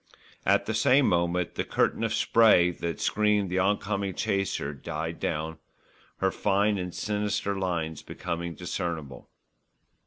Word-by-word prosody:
At - - +4
the 110 - -2
same 130 +5 +4
moment 85 0 +1
the - - -2
curtain - - 0
of - - 0
spray 105 -6 +5
that 85 -2 -4
screened 105 -3 +1
the 95 - +1
on 100 +2 +3
coming 100 -2 -3
chaser 95 -8 -1
died 80 +4 -5
down, 80 0 -3 0.6
her 95 0 +1
fine 100 +1 +1
and 90 0 -4
sinister 105 0 -1
lines 85 -4 -2
becoming 85 0 -5
discernible. 85 -7 -5
90 Hz, 135 wpm, -27 LUFS, 85-105 Hz, 0.6 s, spray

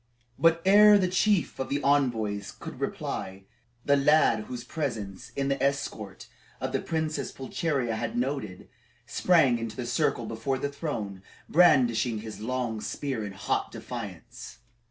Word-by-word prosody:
But 165 +2 +4
ere 210 +2 +8
the 190 -2 +2
chief 185 0 +1
of 135 - -3
the 140 - 0
envoys 115 -8 +1
could - - -10
reply, 95 +1 -4 0.4
the 140 - +4
lad 140 -6 +4
whose 125 -1 -6
presence 115 - -4
in 140 0 -1
the 140 0 -1
escort 125 -8 -2 0.3
the - - -1
Princess 160 -1 -2
Pulcheria 130 -3 -2
had 115 +1 -3
noted, 125 -7 -3 0.4
sprang 145 -10 +3
into 115 -1 -5
the 125 - -4
circle 120 0 0
before 115 +5 -2
the 140 - -2
throne, 115 - -5 0.3
brandishing 125 -9 +4
his 110 -1 -8
long 120 -1 -2
spear 130 -3 -3
in 100 -1 -6
hot 95 - -2
defiance. - - -8
130 Hz, 140 wpm, -28 LUFS, 110-145 Hz, 0.4 s, ere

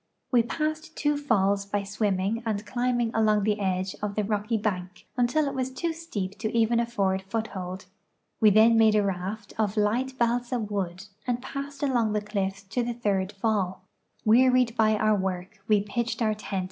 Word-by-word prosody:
We 245 -2 +5
passed 310 +5 -3
two 295 0 +1
falls 200 -8 +2
by 200 0 -2
swimming 200 +1 -1
and 215 -2 -2
climbing 240 0 0
along 215 -2 +3
the 210 0 +1
edge 185 -1 -1
of 205 -1 -3
the 210 - +1
rocky 210 +2 0
bank 185 -3 -3
until 255 +5 +2
it 275 - -2
was 260 -1 -1
too 330 +6 -2
steep 205 - -5
to 220 -1 -2
even 230 +1 +3
afford 200 -5 0
foothold. 190 -3 -4 0.5
We 215 - +7
then 225 +2 +6
made 220 -1 +5
a 210 - +4
raft 195 +2 -4
of 210 0 0
light 245 +6 +1
balsa 240 +1 +1
wood 200 -4 -3 0.2
and 245 -1 0
passed 280 +2 -6
along 240 -6 +2
the 210 - 0
cliffs 200 -1 -3
to 220 +6 -2
the 240 0 -2
third 200 -4 0
fall. 195 -3 -1 0.4
Wearied 250 +1 +4
by 220 -2 +3
our 215 0 +3
work, 190 +1 -3
we 210 -2 +4
j>itched 235 +2 -2
our 215 -1 +2
tent 210 -2 -4
215 Hz, 180 wpm, -27 LUFS, 200-240 Hz, 0.5 s, We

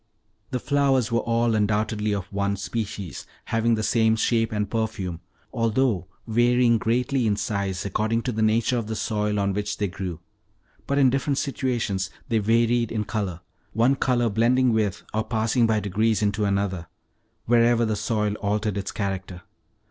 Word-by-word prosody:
The 125 - -2
flowers 135 -4 +1
were 115 - +2
all 115 0 +1
undoubtedly 105 0 0
of 100 -3 -2
one 100 0 0
species, 100 -4 -5 0.2
having 115 0 +1
the 110 - -2
same 110 0 +3
shape 115 0 +1
and 105 -1 -1
perfume, 110 -7 -3 0.3
although 115 -4 +1 0.2
varying 120 0 +3
greatly 125 +2 +1
in 105 - +2
size, 100 -3 -2
according 110 +4 0
to 125 - -1
the 110 -1 -2
nature 115 +3 +2
of 110 - -5
the 110 - -3
soil 105 -1 -1
on 100 -1 0
which 105 +1 -3
they 105 - 0
grew. 90 -3 -5 0.7
But 140 - 0
in 135 -3 +5
different 135 +1 0
situations 120 -10 -1 0.2
they 115 - +2
varied 115 +2 +2
in 110 -2 -1
color, 100 -6 -3 0.3
one 120 +5 +3
color 125 -3 +1
blending 120 +3 +3
with, 105 -3 0
or 110 0 0
passing 115 +1 +1
by 110 -1 +2
degrees 105 +2 +1
into 105 0 +1
another, 100 -3 -1 0.6
wherever 120 0 +4
the 110 -1 0
soil 105 0 -1
altered 105 0 -1
its 100 - -4
character. 95 -3 -4
110 Hz, 165 wpm, -24 LUFS, 100-115 Hz, 0.7 s, in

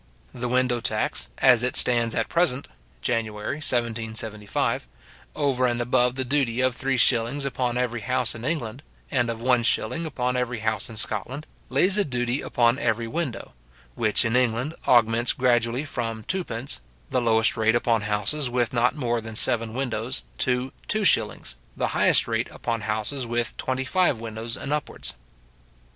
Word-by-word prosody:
The 125 -1 -3
window 125 -1 +1
tax, - - -1
as 120 -2 +6
it 125 0 -1
stands 120 -2 +4
at - - 0
present 160 -6 +1 0.4
(January 110 +2 -2
1775), 110 - -1 0.5
over 130 -3 +1
and 120 0 -1
above 125 +1 +2
the 130 0 -2
duty 125 -3 0
of 130 -1 +2
three 135 0 0
shillings 120 +4 +2
upon 125 -2 -1
every 120 -2 -1
house 125 0 0
in 110 - -9
England, 135 -5 -3 0.3
and 120 -4 +1
of 115 0 -4
one 125 -1 +4
shilling 165 +7 0
upon 125 -4 -1
every 125 -2 -2
house 110 -2 -1
in 115 - -9
Scotland, 115 +7 -3 0.2
lays 185 +10 +3
a - - +4
duty 125 -2 -1
upon 120 0 +2
every 115 -4 0
window, 145 - -4 0.4
which 110 +1 +1
in 115 +1 +1
England 125 +4 +1
augments 120 0 +4
gradually 120 +1 +1
from 115 -5 -4
twopence, 135 - -3 0.3
the 125 - +2
lowest 115 -1 +3
rate 110 +1 +2
upon 115 -2 +2
houses 105 +7 0
with 120 -1 0
not 125 +1 +2
more 120 -5 -1
than 110 0 -8
seven 115 0 +2
windows, 125 -2 -2 0.2
to 125 +1 0
two 215 0 0
shillings, 195 - +1 0.2
the - - 0
highest - - +3
rate - - -1
upon 115 -1 -3
houses 110 +5 -2
with 120 0 -1
twenty 130 0 -2
five 175 -5 +2
windows 115 0 -5
and 145 - -3
upwards. 150 -2 -4
120 Hz, 160 wpm, -25 LUFS, 115-130 Hz, 0.5 s, as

